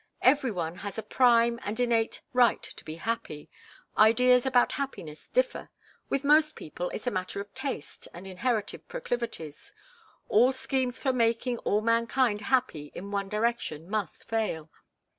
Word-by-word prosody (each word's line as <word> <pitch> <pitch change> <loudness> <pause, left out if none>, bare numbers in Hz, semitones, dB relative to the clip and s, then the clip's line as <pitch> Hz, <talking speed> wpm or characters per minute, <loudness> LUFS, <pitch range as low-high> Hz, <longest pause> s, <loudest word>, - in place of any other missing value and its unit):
Every 265 0 +4
one 175 -4 -3
has 205 +2 -6
a 220 - -3
prime 235 0 +4
and 210 +3 -4
innate 230 -2 +1
right 245 -1 +4
to - - -9
be 155 - -7
happy. 165 -6 -4 0.4
Ideas 250 +4 +5
about 250 -2 +4
happiness 170 - -5
differ. - - 0 0.4
With 275 - 0
most 305 +2 +4
people 175 +3 -5
it's 215 - -6
a 245 - +1
matter 185 +1 -3
of 200 0 -8
taste 265 - -5
and 175 +3 -10
inherited 205 +3 -2
proclivities. 245 - -5 0.5
All 245 +5 +5
schemes 260 -1 -1
for 265 - 0
making 235 0 +1
all 210 - +1
mankind 230 0 +2
happy 205 - 0
in 200 +3 -7
one 200 -1 -2
direction 210 -8 -1
must 210 -7 -3
fail. 210 -9 -2
230 Hz, 150 wpm, -28 LUFS, 200-255 Hz, 0.5 s, Ideas